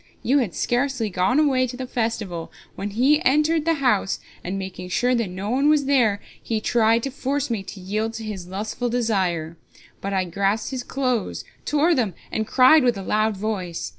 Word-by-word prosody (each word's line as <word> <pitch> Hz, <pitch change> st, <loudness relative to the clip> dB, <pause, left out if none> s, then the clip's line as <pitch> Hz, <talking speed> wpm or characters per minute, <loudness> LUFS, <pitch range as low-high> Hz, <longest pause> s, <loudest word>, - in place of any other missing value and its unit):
You 275 Hz, +4 st, +3 dB
had 215 Hz, -10 st, -2 dB
scarcely 245 Hz, -3 st, 0 dB
gone 185 Hz, +10 st, +2 dB
away 265 Hz, -4 st, +3 dB
to 245 Hz, 0 st, -7 dB
the 260 Hz, -, -4 dB
festival 225 Hz, -9 st, -3 dB, 0.2 s
when 200 Hz, -, -4 dB
be 265 Hz, +9 st, +3 dB
entered 305 Hz, +3 st, +3 dB
the 330 Hz, 0 st, +3 dB
house, 250 Hz, -9 st, +1 dB, 0.2 s
and 185 Hz, +3 st, -3 dB
making 190 Hz, -1 st, -6 dB
sure 245 Hz, +7 st, +1 dB
that 230 Hz, -5 st, 0 dB
no 190 Hz, +4 st, -4 dB
one 275 Hz, +4 st, +3 dB
was 300 Hz, -2 st, +4 dB
here 240 Hz, -7 st, +3 dB, 0.2 s
he 225 Hz, -2 st, -2 dB
tried 225 Hz, +1 st, +2 dB
to 275 Hz, -, -2 dB
force 275 Hz, 0 st, -2 dB
me 220 Hz, -4 st, -1 dB
to 195 Hz, +1 st, -9 dB
yield 215 Hz, +4 st, -2 dB
to 225 Hz, -, -6 dB
his 200 Hz, -5 st, -6 dB
lustful 215 Hz, +6 st, -3 dB
desire. 185 Hz, -9 st, -1 dB, 0.4 s
But 200 Hz, -, -3 dB
I 190 Hz, -1 st, +1 dB
grasped 195 Hz, +7 st, -1 dB
his 260 Hz, -1 st, -3 dB
clothes, 255 Hz, -5 st, -2 dB, 0.2 s
tore 305 Hz, +4 st, +3 dB
them, 220 Hz, -, 0 dB, 0.2 s
and 220 Hz, -1 st, -2 dB
cried 265 Hz, +5 st, +6 dB
with 240 Hz, -4 st, +2 dB
a 195 Hz, -, -5 dB
loud 215 Hz, +1 st, +1 dB
voice. 190 Hz, -5 st, -3 dB
225 Hz, 195 wpm, -23 LUFS, 195-260 Hz, 0.4 s, cried